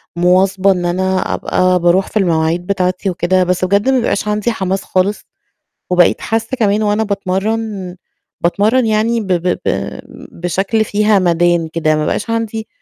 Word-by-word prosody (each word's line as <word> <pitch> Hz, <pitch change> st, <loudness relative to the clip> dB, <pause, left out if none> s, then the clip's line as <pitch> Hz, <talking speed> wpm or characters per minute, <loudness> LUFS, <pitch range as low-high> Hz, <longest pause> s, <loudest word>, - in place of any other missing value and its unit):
مواظبة 185 Hz, +2 st, +3 dB
إن 180 Hz, -2 st, -1 dB
أنا 185 Hz, +1 st, -1 dB
أبقى 185 Hz, 0 st, +1 dB
باروح 175 Hz, +3 st, +2 dB
في -, -, -3 dB
المواعيد 170 Hz, -2 st, 0 dB
بتاعتي 185 Hz, 0 st, -1 dB
وكده، 185 Hz, +1 st, +1 dB
بس 180 Hz, 0 st, 0 dB
بجد 200 Hz, +6 st, +1 dB
ما 265 Hz, -, +3 dB
بيبقاش 210 Hz, -4 st, -1 dB
عندي 210 Hz, +2 st, 0 dB
حماس 195 Hz, -3 st, -2 dB
خالص 190 Hz, +3 st, -1 dB, 0.7 s
وبقيت 180 Hz, -1 st, +3 dB
حاسة 225 Hz, 0 st, -2 dB
كمان 210 Hz, -2 st, +1 dB
وأنا 210 Hz, +1 st, +1 dB
باتمرّن، 200 Hz, -1 st, -3 dB, 0.4 s
باتمرّن 215 Hz, +8 st, +2 dB
يعني 220 Hz, +2 st, +1 dB
ب 210 Hz, -, -6 dB
ب 175 Hz, 0 st, 0 dB, 0.2 s
ب -, -, +2 dB, 0.7 s
بشكل 195 Hz, +5 st, 0 dB
فيه 210 Hz, 0 st, +2 dB
همدان 175 Hz, -2 st, +1 dB
كده 155 Hz, -1 st, 0 dB
ما 155 Hz, -, -1 dB
بقاش 230 Hz, -, -2 dB
عندي 225 Hz, -1 st, -3 dB
190 Hz, 155 wpm, -15 LUFS, 180-215 Hz, 0.7 s, مواظبة